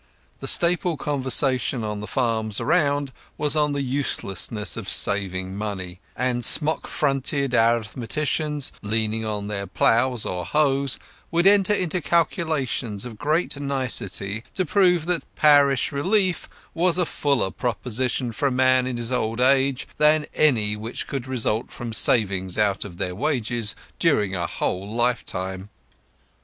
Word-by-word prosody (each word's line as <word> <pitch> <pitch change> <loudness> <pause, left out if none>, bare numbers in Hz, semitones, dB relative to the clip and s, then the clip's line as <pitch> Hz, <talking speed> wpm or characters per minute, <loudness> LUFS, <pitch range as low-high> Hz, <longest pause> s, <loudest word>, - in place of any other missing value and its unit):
The - - -6
staple 175 -1 +2
conversation 130 -3 0
on 105 -1 -4
the 105 - -7
farms 110 -3 -1
around 145 +1 +1 0.3
was 150 0 +1
on 150 -1 +2
the 140 -1 -2
uselessness 115 -6 -2
of 110 -4 -6
saving 95 -2 +1
money; 95 -4 -5 0.2
and 125 0 -1
smock 155 +5 +5
frocked 135 -4 0
arithmeticians, 135 +3 0
leaning 110 +1 -1
on 105 -2 -3
their 100 -1 -4
ploughs 120 +5 +2
or 90 -1 -3
hoes, 140 - +1 0.3
would 170 +1 +1
enter 200 +1 +5
into 180 -2 -1
calculations 150 - -1
of 110 -3 -9
great 155 0 0
nicety 115 -7 -2
to 185 - 0
prove 180 -2 +2
that 175 -1 -3
parish 145 -3 +4
relief 185 +5 0 0.2
was 175 +1 +2
a 180 - +2
fuller 140 -10 0
provision 125 +1 -2
for 140 +6 -1
a - - 0
man 130 0 +3
in 125 -2 -3
his 120 +1 -2
old 115 -2 -1
age 135 +1 +2
than 150 0 +4
any 110 -9 +2
which 110 +3 -6
could 135 -2 -5
result 115 -3 -1
from 120 -2 -7
savings 95 -5 +2
out 105 -2 +1
of 90 -4 -10
their 90 0 -3
wages 115 -1 -1 0.2
during 100 -2 +2
a 85 -2 -2
whole 95 +6 -3
lifetime. 100 -5 -2
125 Hz, 140 wpm, -23 LUFS, 105-145 Hz, 0.3 s, smock